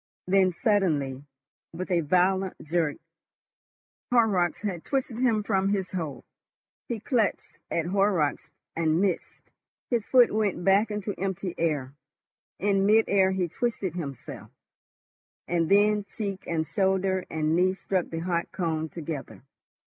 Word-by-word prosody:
Then 190 0 +3
suddenly, 155 - 0 0.5
with 185 +3 -5
a 175 -1 +3
violent 185 +4 +2
jerk, 160 -2 0 1.1
Horrocks 205 -8 +2
had 185 -5 -3
twisted 260 -4 -2
him 230 -4 +2
from 195 -2 +1
his 195 -2 -1
hold. 150 -9 -4 0.6
He 235 -2 -3
clutched 225 -2 -1
at 165 - -1
Horrocks 180 -6 +1 0.3
and 160 0 +2
missed, 190 -3 -2 0.4
his 235 -3 +1
foot 250 +2 +5
went 205 -5 0
back 195 +3 +4
into 210 -1 -3
empty 190 -1 -2
air; 145 -5 -1 0.6
in 195 0 +2
mid 220 +1 +5
air 190 -1 +4
he 190 -2 0
twisted 215 -3 -2
himself, 140 -8 -7 1.0
and 170 -2 0
then 205 +1 +4
cheek 200 -2 -5
and 160 -2 0
shoulder 190 +1 +1
and 155 0 0
knee 185 +2 +3
struck 190 -2 -2
the 165 0 -4
hot 170 -1 -1
cone 160 -3 -2
together. 150 -6 -7
185 Hz, 130 wpm, -27 LUFS, 165-205 Hz, 1.1 s, foot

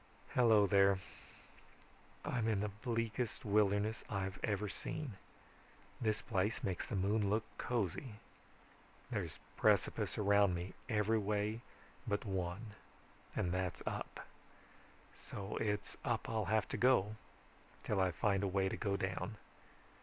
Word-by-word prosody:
"Hello 110 -4 +5
there. 100 0 +5 1.3
I'm 120 -3 0
in 105 -3 +2
the 105 - 0
bleakest 115 -1 -1
wilderness 105 +1 +2
I've 95 -1 -2
ever 105 0 0
seen. 140 +2 -4 0.9
This 110 -2 +1
place 105 -1 0
makes 95 -3 -2
the 110 - -3
moon 100 +2 +2
look 110 +2 +2 0.2
cozy. 115 0 -1 1.0
There's - - -2 0.2
precipice - - +2
around 100 -2 +4
me 90 +2 -4 0.2
every 110 0 +3
way 105 +2 0 0.5
but 100 0 0
one 95 +2 -3 0.6
and 90 - 0
that's 90 0 -2
up. - - -4 1.1
So 100 +1 -4
it's 105 -2 -1
up - - 0
I'll 110 -2 0
have 110 0 +2
to - - -2
go 115 -5 +4 0.7
till 100 -2 +1
I 95 - +4
find 100 +3 +1
a 100 - +1
way 95 0 +2
to - - -3
go 100 -3 0
down. 95 +2 -2
105 Hz, 130 wpm, -37 LUFS, 95-110 Hz, 1.3 s, Hello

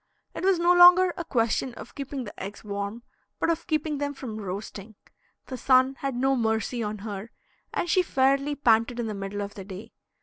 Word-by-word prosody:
It - - -6
was 380 -1 +4
no 345 +1 +4
longer 355 +1 +7
a 345 - -4
question 240 -3 0
of - - -11
keeping 275 -1 -5
the 205 - -9
eggs 200 +2 -8
warm, 200 +2 -5 0.3
but - - +1
of 335 0 -4
keeping 305 -2 -1
them 285 0 -2
from 225 -5 -6
roasting. 200 +2 -7 0.5
The 260 - -6
sun 260 +1 +4
had 275 -2 -3
no 270 +2 +2
mercy 225 0 -1
on 215 -1 -3
her, 205 +1 -6 0.4
and - - -2
she 365 +2 +4
fairly 275 -2 +1
panted 235 -3 +2
in 235 - -1
the 215 - -3
middle 200 0 -5
of 200 - -7
the 195 - -8
day. 200 +4 -10
245 Hz, 200 wpm, -26 LUFS, 210-285 Hz, 0.5 s, longer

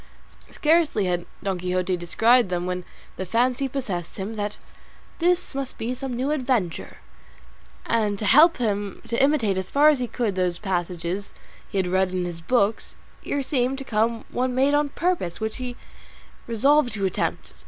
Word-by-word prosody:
Scarcely 310 - +2
had 175 -1 -1 0.2
Don 190 -2 -1
Quixote 180 +1 0
descried 225 +6 +3
them 175 -1 -1
when 180 0 -3 0.3
the - - -3
fancy 250 +6 +1
possessed 200 -11 -4
him 200 +3 -4
that 210 -1 -3 0.6
this 355 0 +1
must 270 -1 -4
be 230 +2 -2
some 255 -1 -5
new 260 +4 -1
adventure; 250 - -1 0.9
and 210 -3 +1
to 210 - -4
help 305 - +6
him 205 -4 -2
to 235 - 0
imitate 240 -10 +2
as 190 - -5
far 295 +2 +6
as 295 -3 +3
he 250 - -1
could 230 -4 -1
those 180 -2 0
passages 180 0 -3 0.3
he 200 - -4
had 190 - +2
read 185 +1 +2
of 185 - -6
in 180 -1 0
his 170 -1 -6
books, 215 +2 +1 0.3
here 285 -1 -2
seemed 260 -1 0
to 270 - -5
come 225 -1 0
one 250 0 -1
made 270 +2 +3
on 290 0 +2
purpose, 335 - -1
which 220 0 -3
he 250 -1 -5 0.7
resolved 255 +4 +3
to 200 -2 -1
attempt. 185 - -2
225 Hz, 175 wpm, -24 LUFS, 185-265 Hz, 0.9 s, help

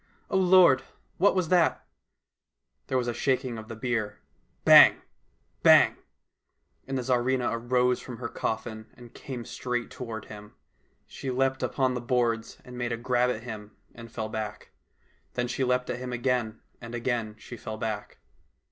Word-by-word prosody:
O - - 0
Lord! 180 -7 +6 0.4
what 200 +3 +4
was 180 -4 0
that? 175 -2 +2 1.0
There 130 - 0
was 125 -1 -1
a 120 - -1
shaking 130 -1 -1
of 110 - -10
the 115 - -7
bier 115 -2 -2 0.2
— - - -42
bang! - - +9 0.6
bang! - - +6 0.5
— - - -45
and 135 0 -2
the 130 - -2
Tsarivna 125 0 +1
arose 125 +1 +1
from 125 -2 -8
her 120 0 -4
coffin 110 -1 -4
and 120 -1 -14
came 125 -4 -7
straight 125 -1 -4
toward 115 -4 -6
him. 105 0 -12 0.5
She 135 - -7
leaped 130 +1 0
upon 130 -2 0
the 125 - -3
boards 120 -2 0
and 125 0 -9
made 120 0 -2
a 115 - -1
grab 125 +1 +1
at 115 -2 -3
him 110 -3 -8 0.2
and 115 -1 -11
fell 110 -2 -4
back. 110 -2 -6 0.6
Then 125 0 -1
she 130 - -2
leaped 125 0 0
at 120 - -4
him 125 0 -5
again, 120 -2 -1 0.2
and 115 0 -7
again 115 -3 -2
she 120 - -10
fell 110 -1 -7
back. 110 -2 -4
120 Hz, 170 wpm, -27 LUFS, 115-130 Hz, 1.0 s, bang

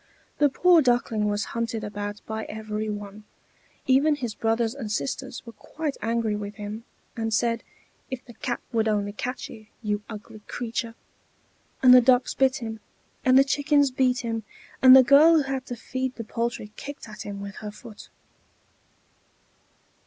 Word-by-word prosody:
The 290 - +5
poor 350 +4 +5
Duckling 240 -5 +1
was 205 0 -1
hunted 230 -1 -2
about 205 0 -5
by 220 0 -4
every 215 0 -4
one; 205 0 -7 0.6
even 280 +4 +4
his 245 -6 -4
brothers 225 +1 0
and 240 -7 -6
sisters 245 - -4
were 230 - -10
quite 295 +7 -5
angry 230 -2 0
with 205 0 -6
him, 210 +2 -7 0.3
and 225 -1 -2
said, 230 +1 +1 0.5
"If 260 -1 -6
the 240 - -12
cat 240 +1 -4
would 225 -2 +1
only 205 -1 0
catch 250 +4 -4
you, 215 -1 -13 0.2
you 210 -1 -1
ugly 215 0 -9
creature!" 230 -1 -4 0.9
And 250 -1 +9
the 250 - +9
ducks 250 +1 +3
bit 265 -1 +2
him, 225 -1 -5 0.4
and 260 0 +5
the 270 - +8
chickens 285 0 +2
beat 255 -1 +1
him, 225 -2 -3 0.4
and 260 0 +10
the 265 - +9
girl 290 +6 +7
who 310 - +4
had 270 -1 -4
to 245 - -4
feed 260 +2 -4
the 230 - -6
poultry 230 -1 -3
kicked 285 -4 -8
at 215 -1 -9
him 200 -1 -6
with 200 0 -8
her 210 - -6
foot. 215 +1 -12
230 Hz, 165 wpm, -25 LUFS, 215-260 Hz, 0.9 s, and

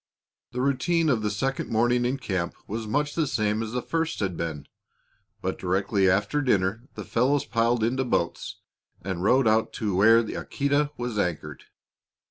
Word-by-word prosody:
The 125 +1 -2
routine 155 +5 +1
of 120 -6 +2
the 105 - 0
second 135 +6 -2
morning 120 +2 +2
in 130 +3 0
camp 95 -9 -3
was 110 +1 -5
much 145 +6 0
the 160 -3 0
same 105 -3 0
as 110 -1 -4
the 125 -1 -2
first 165 0 -2
had 95 -4 -1
been. 80 -4 -5 0.8
But - - -2
directly 95 +1 +1
after 105 +10 +1
dinner 115 -1 0
the - - -6
fellows 135 +4 +1
piled 115 +1 +1
into 130 +4 +1
boats 100 -9 -2 0.5
and 95 -1 -3
rowed 125 +4 +4
out 110 +1 +2
to 105 -4 -2
where 115 +4 +6
the 110 - -6
Aquita 140 +1 0
was 120 -3 -3
anchored. 90 -5 -3
115 Hz, 170 wpm, -26 LUFS, 100-130 Hz, 0.8 s, where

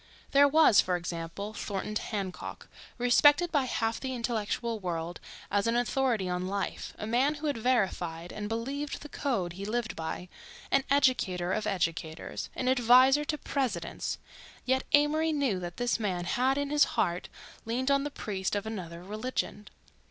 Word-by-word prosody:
There 285 +1 +7
was, 300 -8 +6
for 180 - 0
example, 170 +4 -5
Thornton 205 0 -4
Hancock, 200 -4 -4 0.3
respected 290 +7 +5
by 285 -4 +2
half 225 -2 -1
the 260 -1 -3
intellectual 230 -1 -2
world 170 -2 -4 0.3
as 205 +2 +2
an 230 - +2
authority 240 -4 +1
on 180 0 -2
life, 200 0 -3
a - - -5
man 255 +7 +2
who 300 +1 -6
had 285 -6 0
verified 180 -8 0
and 210 0 -5
believed 275 +7 -3
the 295 - -9
code 200 -15 -1
he 195 +3 -7
lived 220 +2 -2
by, 165 +2 -5 0.4
an 275 - +4
educator 190 -10 +2
of 215 - -1
educators, 165 -4 -2
an 255 - -2
adviser 255 +3 +6
to 300 0 -1
Presidents—yet 260 - -3
Amory 305 +2 +4
knew 275 -11 +1
that 175 -1 -6
this 245 -1 0
man 185 -5 -1
had, 260 +5 +1
in 285 0 -1
his 295 -1 +5
heart, 175 +1 0 0.4
leaned 255 +4 0
on 275 0 +3
the 290 - -2
priest 195 -8 -3
of 205 - -2
another 175 -6 -6
religion. 215 +1 -3
225 Hz, 160 wpm, -29 LUFS, 185-270 Hz, 0.4 s, There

